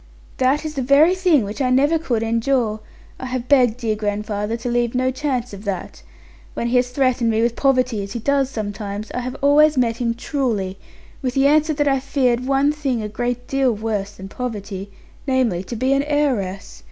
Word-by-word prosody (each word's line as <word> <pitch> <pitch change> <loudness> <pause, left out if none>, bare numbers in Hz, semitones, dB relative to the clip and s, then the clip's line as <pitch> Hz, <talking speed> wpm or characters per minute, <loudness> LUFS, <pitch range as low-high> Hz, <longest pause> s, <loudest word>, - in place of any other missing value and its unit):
'That 270 +4 +1
is 310 - -4
the 275 - -2
very 280 +7 +5
thing 360 - +3
which 205 +7 -5
I 255 - +2
never 285 +6 +3
could 240 -8 -1
endure. 230 -1 0 0.4
I 260 - -5
have 250 -1 -4
begged 250 -5 +4
dear 225 -3 -1
grandfather 210 +1 -2
to 235 - -6
leave 240 0 0
no 255 +1 +1
chance 260 -4 -2
of 200 0 -9
that. 195 - -5 0.5
When 235 - -2
he 250 - +3
has 250 0 +2
threatened 255 -2 +1
me 225 0 +1
with 235 0 +1
poverty, 255 -5 +1
as 200 0 -6
he 235 - -3
does 275 +2 +1
sometimes, 205 -2 -5
I - - -3
have 250 +1 -5
always 300 +1 +5
met 235 -2 +1
him 235 -1 -1
truly, 220 -9 -2 0.4
with 255 -2 -2
the 270 0 +3
answer 305 +2 +3
that 290 0 +1
I 270 -1 +2
feared 255 -2 0
one 275 +1 +3
thing 275 -7 -2
a - - -3
great 245 +3 -3
deal 270 -3 +1
worse 210 -2 -3
than 190 -1 -9
poverty; 205 -4 -5 0.4
namely, 245 -9 +1
to 240 - -6
be 260 +4 +1
an 275 - +2
heiress. 245 - -1
250 Hz, 200 wpm, -21 LUFS, 220-275 Hz, 0.5 s, very